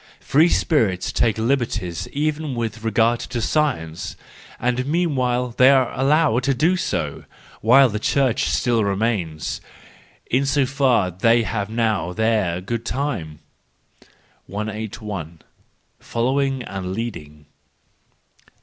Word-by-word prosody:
—Free 160 +5 +3
Spirits 110 - +1
take 110 -3 +1
liberties 115 -8 -1
even 150 -1 -2
with 115 -1 -4
regard 115 +1 +2
to 125 - -4
Science—and 120 - -2
meanwhile 130 -7 0
they 130 +1 +6
are 130 -3 +4
allowed 140 -1 +2
to 135 -1 +2
do 165 +8 +2
so,—while 135 - +1
the 105 -1 -3
Church 130 +1 +1
still 120 -3 +1
remains!—In 100 - -3
so 135 0 +2
far 125 -8 +2
they 115 +6 +3
have 105 -2 -3
now 110 -6 0
their 110 -5 0
good 115 +4 -4
time. 120 - -3 1.1
181. 105 -5 -6 0.6
Following 135 +2 -1
and 95 -3 -5
Leading. 75 -10 -6
115 Hz, 105 wpm, -21 LUFS, 100-135 Hz, 1.1 s, they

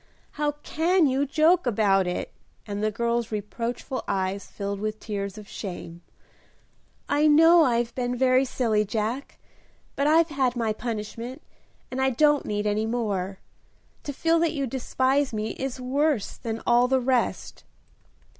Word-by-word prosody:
"How 295 0 -1
can 340 +2 +2
you 275 +1 +1
joke 315 +3 +3
about 200 -4 +3
it!" 180 - -3 0.3
and 205 0 -4
the 215 - +2
girl's 235 +1 -1
reproachful 230 +5 -4
eyes 190 +1 -2
filled 200 -1 -5
with 215 +1 -3
tears 200 -1 -4
of 210 -1 -10
shame. 175 -4 -7 1.1
"I 295 +2 +3
know 325 +3 +7
I've 240 -2 0
been 245 -1 -2
very 255 +1 +4
silly, 230 -5 +1
Jack, 220 +6 -3 0.6
but 280 - +1
I've 325 +2 +4
had 265 -4 0
my 225 -3 0
punishment, 230 +2 -5 0.5
and 260 +1 -2
I 265 - +3
don't 295 +3 +3
need 210 0 -2
any 210 +1 0
more. 200 -5 -2 0.6
To 285 - -5
feel 330 +4 +2
that 335 -1 +1
you 280 -3 -1
despise 265 +2 0
me 215 0 -2
is 265 -1 -5
worse 270 -1 0
than 225 -1 -5
all 240 +1 +4
the 260 +1 +2
rest." 255 -1 -1
240 Hz, 150 wpm, -25 LUFS, 215-275 Hz, 1.1 s, know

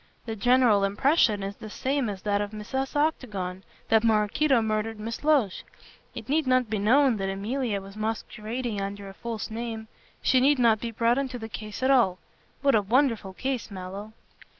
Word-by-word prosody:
The 225 -2 -4
general 240 -2 +4
impression 210 +1 +2
is 195 +1 -5
the 215 - -9
same 265 +2 -1
as 195 -2 -6
that 205 -1 +1
of 205 - -2
Mrs. 230 +7 -4
Octagon, 210 -12 -1 0.3
that 225 0 +4
Maraquito 230 +5 +3
murdered 220 0 -1
Miss 225 +4 -5
Loach. 285 -10 +2 0.5
It - - -7
need 295 +1 +1
not 255 -3 +2
be 215 - 0
known 250 +3 +4
that 195 -1 -2
Emilia 210 +3 -2
was 195 +1 -12
masquerading 220 +1 -3
under 200 0 -5
a - - -10
false 225 +1 -5
name. 225 -1 -5 0.4
She 260 - +4
need 280 +3 +4
not 230 -3 +4
be 235 - -4
brought 230 +3 +1
into 260 -2 -3
the 225 -2 -6
case 215 +2 -7
at 265 - +4
all. 230 -9 +4 0.5
What 275 -1 +4
a 215 - +4
wonderful 225 -2 +1
case, 260 +3 -3
Mallow." 195 +2 -7
225 Hz, 180 wpm, -26 LUFS, 205-255 Hz, 0.5 s, general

